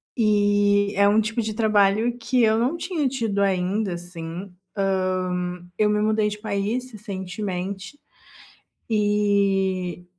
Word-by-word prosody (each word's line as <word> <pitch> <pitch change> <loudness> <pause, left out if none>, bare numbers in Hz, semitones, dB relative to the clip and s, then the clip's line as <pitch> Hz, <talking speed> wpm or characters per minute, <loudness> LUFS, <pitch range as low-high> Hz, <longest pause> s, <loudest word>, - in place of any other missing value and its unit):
e 205 -2 +3
é 200 0 +5
um 215 +2 +4
tipo 220 +2 -1
de 215 -1 -4
trabalho 215 +1 +3
que 245 +1 +1
eu 220 0 +4
não 265 +8 0
tinha 330 -3 -1
tido 225 -6 -2
ainda, 195 +1 0
assim. 175 +1 -7 0.5
Hã, 180 -1 -2
eu 210 -1 +4
me 210 0 +1
mudei 215 0 +2
de 210 0 -5
país 215 +4 -2
recentemente 195 +2 -5 0.9
e 200 -4 +1
205 Hz, 125 wpm, -23 LUFS, 190-220 Hz, 0.9 s, é